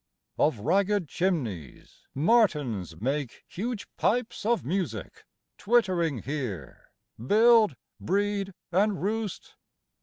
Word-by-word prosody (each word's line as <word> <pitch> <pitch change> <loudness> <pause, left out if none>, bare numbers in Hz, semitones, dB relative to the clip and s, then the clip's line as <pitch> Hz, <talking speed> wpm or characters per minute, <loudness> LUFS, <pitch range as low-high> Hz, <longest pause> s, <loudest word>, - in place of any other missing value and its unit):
3. - - +4
Of 145 -7 0
ragged 195 - +1
chimneys 125 - -3
martins 140 - +1
make 135 +3 -3
Huge 225 +3 -4
pipes 230 -2 0
of 235 0 +1
music; 155 - -3 0.3
twittering 180 - +1
here 120 - -5 0.3
Build, 220 - +5 0.2
breed, 200 0 -1 0.2
and 200 +2 +2
roost. 215 -1 -3
180 Hz, 95 wpm, -27 LUFS, 135-210 Hz, 0.3 s, Build